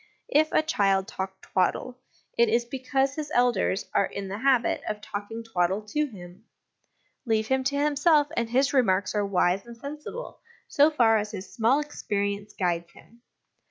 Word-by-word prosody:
If 310 +2 +3
a - - +3
child 195 -10 +1
talk 190 0 -5
twaddle, 245 +7 -1 0.4
it 235 -1 +4
is 235 +2 +2
because 270 +2 -1
his 300 0 -5
elders 240 -6 +2
are 200 - +3
in 195 -1 -6
the 200 +2 -5
habit 260 -2 +2
of 210 - -3
talking 210 +2 -6
twaddle 190 -2 0
to 300 +5 0
him; 185 -4 -12 0.8
leave 220 -3 0
him 265 0 +2
to 280 +1 0
himself, 295 +1 +3
and 235 -1 -1
his 265 +4 +2
remarks 200 -7 +2
are 210 -1 +1
wise 195 -1 +1
and 235 0 -10
sensible 300 - -8 0.3
so 290 +2 +4
far 235 -7 +4
as 210 0 -4
his 195 -3 -8
small 235 +5 +3
experience 205 -7 -3
guides 170 -2 -2
him. 235 +1 -19
225 Hz, 165 wpm, -26 LUFS, 200-275 Hz, 0.8 s, it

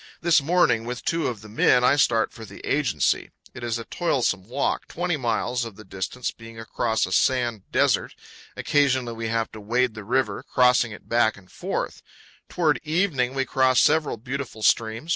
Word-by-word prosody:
This 170 -3 +4
morning, 140 -8 +2
with 125 +1 -6
two 165 -1 0
of 115 -5 -4
the 110 - -12
men, 125 +3 +3
I 125 - +5
start 115 -5 +2
for 115 - -10
the 100 -2 -11
agency. 140 -6 0 0.2
It 120 - -9
is 120 -1 -1
a 115 - -7
toilsome 125 - -1
walk, 135 +3 -1
20 175 0 -2
miles 120 -1 -1
of 115 -4 -7
the 110 - -12
distance 95 +6 -4
being 115 0 -12
across 110 0 -1
a 95 - -8
sand 120 0 +1
desert. - - +1 0.4
Occasionally 130 -4 +1
we 115 0 -4
have 115 0 -1
to 110 - -10
wade 120 +3 +1
the 110 -1 -8
river, 130 +5 0
crossing 125 -2 +3
it 105 - -11
back 115 -3 +2
and 95 -2 -18
forth. - - -4 0.5
Toward 155 -4 +1
evening 155 -6 0
we 135 -1 0
cross 130 -1 +3
several 155 -5 +2
beautiful 125 -1 -6
streams, - - +7
powell 115 -1 -4
canyons 110 +1 -6
124. 165 - -14
120 Hz, 195 wpm, -24 LUFS, 110-135 Hz, 0.5 s, streams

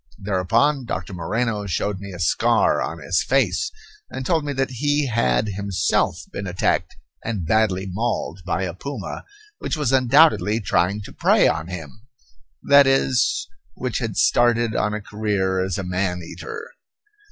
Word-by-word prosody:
Thereupon 115 +9 +1
Doctor 100 - -4
Moreno 105 +3 -2
showed 95 +2 -2
me 100 0 -8
a 90 - -8
scar 85 -3 +2
on 80 - -3
his 85 +2 0
face, 120 -8 +1 0.4
and 130 - -6
told 165 -1 +1
me 145 - -3
that 135 -1 -1
he 145 +3 0
had 105 - +1
himself 100 -1 0
been 100 - -5
attacked 90 0 0 0.3
and 105 -7 -3
badly 100 -1 +1
mauled 95 -3 -2
by 90 +1 -1
a 90 -2 -3
puma 140 - -6 0.3
which - - -3
was 145 -5 0
undoubtedly 130 -3 +4
trying 100 0 0
to - - -11
prey - - +4
on 80 +1 -1
him; 90 - -9 0.6
that 140 -1 +6
is, 130 -3 +2 0.3
which - - -3
had - - -4
started 120 -2 +3
on 105 0 0
a 105 - -4
career 100 -3 -1
as 95 -2 -2
a 100 - -3
man 90 -1 -2
eater. 455 - -8
105 Hz, 155 wpm, -22 LUFS, 95-130 Hz, 0.6 s, that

